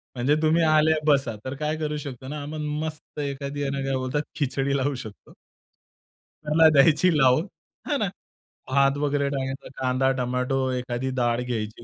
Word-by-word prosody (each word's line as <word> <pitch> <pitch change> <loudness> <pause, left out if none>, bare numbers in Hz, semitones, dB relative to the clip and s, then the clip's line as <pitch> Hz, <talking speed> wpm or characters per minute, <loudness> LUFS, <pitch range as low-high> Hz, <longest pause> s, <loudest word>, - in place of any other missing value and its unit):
म्हणजे 130 +4 +2
तुम्ही 160 +2 +3
आले 155 0 +4
बसा. 135 -6 +3
तर 130 +1 -4
काय 150 +2 -2
करू 150 -1 -2
शकतो 130 -3 -7
ना, 150 +2 -5
आपण 155 +1 -5 0.2
मस्त 155 -1 -8
एखादी 140 0 -4
आहे 140 - -1
ना, 140 0 -2
काय 135 0 0
बोलतात 130 +2 -1
खिचडी 140 -1 0
लावू 140 +1 0
शकतो. 110 -4 -10 1.1
त्याला 155 +2 +5
द्यायची 155 +4 +5
लावून, 130 +2 +4 0.5
है - - +2
ना. - - 0 0.6
भात 140 +1 +3
वगैरे 145 -1 0
टाकायचा, 135 -1 -4
कांदा, 130 0 +1
टोमॅटो, 125 +1 -1
एखादी 125 0 -2
डाळ 120 0 +1
घ्यायची 115 -2 -4
140 Hz, 160 wpm, -25 LUFS, 130-150 Hz, 1.1 s, त्याला